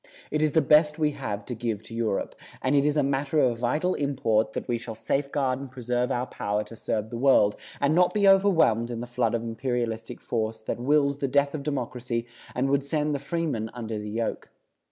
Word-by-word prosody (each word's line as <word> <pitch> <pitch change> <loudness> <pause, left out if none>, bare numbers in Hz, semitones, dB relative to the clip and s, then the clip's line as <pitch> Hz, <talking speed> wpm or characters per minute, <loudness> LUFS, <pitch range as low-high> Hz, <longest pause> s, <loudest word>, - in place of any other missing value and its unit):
It 150 - 0
is 155 -2 +2
the 160 - +4
best 150 0 +5
we 155 -2 +2
have 105 -8 -5
to 125 - -4
give 115 -2 -3
to 115 - -11
Europe, 115 -3 -1 0.3
and 130 +2 +2
it 140 0 +4
is 150 0 +2
a 145 - +3
matter 140 +2 0
of 120 -4 +2
vital 150 +10 +1
import 115 -6 0
that - - -4
we 120 -1 0
shall 115 -1 -6
safeguard 135 +3 -1
and 140 -1 -7
preserve 125 0 -1
our 125 0 0
power 105 -3 -2
to 115 - -12
serve 110 0 -3
the 115 - -4
world, 120 -6 +4 0.2
and 140 +2 +2
not 180 +2 +4
be 205 -2 +3
overwhelmed 175 - +4
in 120 -1 -4
the 120 - -4
flood 120 -2 0
of 115 - -2
imperialistic 115 -1 -3
force 110 -1 -3
that 110 - -3
wills 140 +2 +2
the 140 - 0
death 140 +1 +2
of 155 - -3
democracy 125 -4 -3 0.3
and 135 +2 +1
would 140 0 +2
send 150 +1 0
the 140 - -1
freeman 140 -7 -2
under 110 -3 -4
the 105 0 -6
yoke. 115 +2 -3
125 Hz, 215 wpm, -26 LUFS, 115-145 Hz, 0.3 s, best